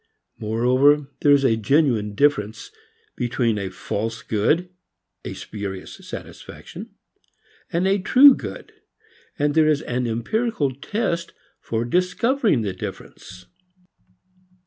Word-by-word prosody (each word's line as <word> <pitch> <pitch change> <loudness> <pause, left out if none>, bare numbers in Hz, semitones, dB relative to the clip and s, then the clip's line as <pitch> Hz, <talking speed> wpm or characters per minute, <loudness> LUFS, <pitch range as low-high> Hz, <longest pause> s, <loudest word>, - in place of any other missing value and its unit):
Moreover 130 +6 +2
there 145 - +4
is 140 -1 +5
a 115 - +4
genuine 115 -4 +1
difference 110 -7 0 0.4
between 120 -3 0
a 95 -1 -3
false 110 +4 -4
good, 155 - 0 0.5
a - - -6
spurious 100 -3 -7
satisfaction, - - -10 0.8
and 175 +3 +1
a 195 +1 +2
"true" 260 +9 +7
good, - - -8 0.7
and 145 0 +1
there 155 0 +4
is 150 -2 +2
an 125 0 -2
empirical 145 - -1
test 170 - -3 0.3
for 115 +1 -3
discovering 180 - +1
the 100 -3 -2
difference. 90 0 -9
135 Hz, 110 wpm, -22 LUFS, 110-170 Hz, 0.8 s, true